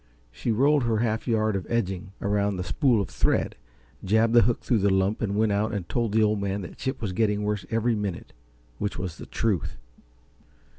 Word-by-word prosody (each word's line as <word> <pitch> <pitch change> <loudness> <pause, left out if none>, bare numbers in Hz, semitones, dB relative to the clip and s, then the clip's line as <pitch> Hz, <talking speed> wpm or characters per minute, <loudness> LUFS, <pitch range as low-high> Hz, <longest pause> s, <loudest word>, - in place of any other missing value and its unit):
She 115 - -2
rolled 140 +4 +3
her 115 -2 +1
half 110 0 -1
yard 110 -3 +1
of 95 - -3
"edging" 95 -5 -2
around 100 0 +1
the 90 - -2
spool 125 - +2
of 100 - -4
thread, - - +1 0.5
jabbed 110 +4 +3
the 120 - +7
hook 115 +2 +1
through 120 - +2
the 100 +1 +3
lump 95 +2 +1
and 100 -3 -1
went 110 0 +2
out 105 +2 0
and 95 -4 -4
told 115 -3 -1
the 110 +1 +3
Old 105 -1 +1
Man 100 0 -2
that 90 - -9
Chip 130 -2 -3
was 95 -4 -2
getting 105 0 +1
worse 105 -1 -2
every 115 +1 +1
minute 105 -5 -4 0.5
which 105 - -2
was 90 -3 -5
the - - -9
truth. 105 -9 -1
105 Hz, 205 wpm, -26 LUFS, 100-115 Hz, 0.5 s, the